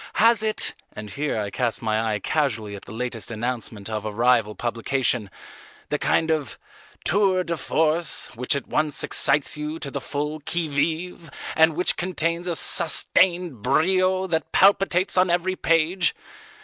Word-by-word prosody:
Has 230 0 +4
it," 215 0 -1 0.2
and 105 -1 -8
here 145 -5 -2
I 100 -1 -3
cast 120 0 -2
my 110 0 +1
eye - - 0
casually 110 -4 -1
at 100 - -11
the - - -11
latest 115 0 -5
announcement 115 -3 -4
of 110 -2 -4
a 110 - -4
rival 115 -1 +2
publication, 120 -2 -1 0.6
"the - - -1
kind 160 0 +1
of 150 -8 -2 0.5
tour 190 0 +3
de 170 -1 -2
force 160 +1 0
which 125 +5 0
at 140 - -3
once 150 -2 -1
excites 150 0 +1
you 150 +1 -4
to 140 -4 -7
the - - -4
full 150 +2 -3
qui 160 +2 -2
vive 165 +3 -2 0.3
and 160 0 +4
which 180 +2 +1
contains 170 -1 -1
a 175 - -1
sustained 170 - +2
brio 185 - +2
that 160 -4 -2
palpitates 190 -1 +3
on 185 0 +3
every 175 +2 0
page? 165 +2 +2
155 Hz, 160 wpm, -23 LUFS, 120-175 Hz, 0.6 s, Has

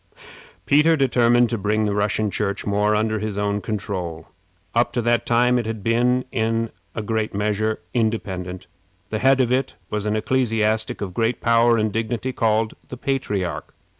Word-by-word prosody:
Peter 155 +3 +4
determined 120 -2 +4
to 115 -1 -2
bring 105 +2 +1
the 105 - 0
Russian 105 +1 0
Church 100 +1 -2
more 105 +1 +2
under 110 0 0
his 105 -1 -4
own 105 0 0
control. 90 -6 -4 0.5
Up - - +2
to 120 - 0
that 120 0 +1
time 125 +1 +3
it 115 - -3
had 110 -3 -4
been, 125 +3 +2
in 115 0 0 0.2
a 110 - -3
great 110 -1 -2
measure, 105 +1 -1
independent. 95 -6 -2 0.5
The - - -1
head 135 0 +4
of 125 -2 +2
it 130 +1 0 0.2
was 105 0 -2
an 105 - 0
ecclesiastic 110 -2 0
of 95 -3 -4
great 115 +5 0
power 115 0 +4
and 110 -1 0
dignity, 115 +3 -2
called 110 -1 +1 0.2
the 125 - -7
Patriarch. 105 -10 -3
110 Hz, 165 wpm, -22 LUFS, 105-120 Hz, 0.5 s, Peter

